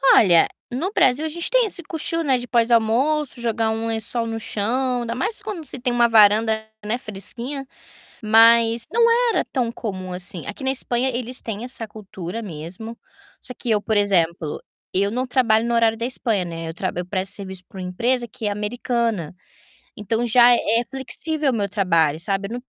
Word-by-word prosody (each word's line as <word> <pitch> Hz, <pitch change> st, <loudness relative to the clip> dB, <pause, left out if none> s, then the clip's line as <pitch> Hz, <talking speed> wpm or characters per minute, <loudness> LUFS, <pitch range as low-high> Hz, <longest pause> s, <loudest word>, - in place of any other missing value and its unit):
Olha, 175 Hz, -5 st, +6 dB, 0.2 s
no 320 Hz, +11 st, -2 dB
Brasil, 275 Hz, -, +3 dB
a -, -, -2 dB
gente 340 Hz, +2 st, -3 dB
tem -, -, +4 dB
esse 360 Hz, -4 st, -2 dB
cochilo, 330 Hz, +2 st, -2 dB
né, 270 Hz, -4 st, +2 dB
de 245 Hz, 0 st, -6 dB
pós-almoço, 240 Hz, +5 st, +2 dB
jogar 225 Hz, -1 st, 0 dB
um 225 Hz, +1 st, -2 dB
lençol 225 Hz, +1 st, -2 dB
no 225 Hz, 0 st, -4 dB
chão, 245 Hz, +4 st, -1 dB
ainda 235 Hz, 0 st, -3 dB
mais 425 Hz, -, -2 dB
quando 405 Hz, -7 st, -6 dB
se 270 Hz, -, -5 dB
tem 245 Hz, 0 st, -1 dB
uma 240 Hz, 0 st, +4 dB
varanda, 220 Hz, 0 st, +4 dB, 0.2 s
né, 220 Hz, +3 st, 0 dB
fresquinha, 245 Hz, +6 st, -5 dB, 0.6 s
mas 230 Hz, +1 st, +5 dB
não 465 Hz, +1 st, +4 dB, 0.2 s
era -, -, +1 dB
tão 245 Hz, -4 st, 0 dB
comum 185 Hz, -6 st, -5 dB
assim. 180 Hz, -1 st, -3 dB
Aqui 205 Hz, +6 st, -7 dB
na 265 Hz, -, +2 dB
Espanha 250 Hz, -1 st, 0 dB
eles 250 Hz, 0 st, -4 dB
têm 225 Hz, 0 st, -5 dB
essa 245 Hz, -2 st, -6 dB
cultura 205 Hz, -1 st, -7 dB
mesmo, 190 Hz, +6 st, -7 dB, 0.4 s
só 250 Hz, -, -6 dB
que 240 Hz, -, -4 dB
eu, 215 Hz, -2 st, +3 dB
por 220 Hz, +1 st, -1 dB
exemplo, 170 Hz, -6 st, +1 dB, 0.3 s
eu 200 Hz, +2 st, +1 dB
não 250 Hz, +4 st, -2 dB
trabalho 235 Hz, -3 st, +2 dB
no 235 Hz, -, 0 dB
horário 225 Hz, -1 st, +3 dB
da 230 Hz, -, -1 dB
Espanha, 225 Hz, -6 st, 0 dB
né, 165 Hz, -1 st, -6 dB
eu 160 Hz, -, -6 dB
tra 185 Hz, +2 st, -2 dB
eu 180 Hz, 0 st, -3 dB
presto 190 Hz, +1 st, -1 dB
serviço 190 Hz, -2 st, -5 dB
pra 195 Hz, -, -11 dB
uma 180 Hz, -, -4 dB
empresa 240 Hz, +7 st, 0 dB
que 215 Hz, +1 st, -6 dB
é -, -, +1 dB
americana, 215 Hz, -3 st, -2 dB, 0.7 s
então, 225 Hz, +3 st, -1 dB
já 240 Hz, +1 st, +6 dB
é 230 Hz, 0 st, +1 dB
flexível 290 Hz, +2 st, -2 dB
o -, -, -1 dB
meu 200 Hz, -2 st, -1 dB
trabalho, 165 Hz, -7 st, +1 dB
sabe, 195 Hz, +3 st, -1 dB
eu 230 Hz, -, -6 dB
não 245 Hz, -, -5 dB
230 Hz, 190 wpm, -22 LUFS, 200-250 Hz, 0.7 s, Olha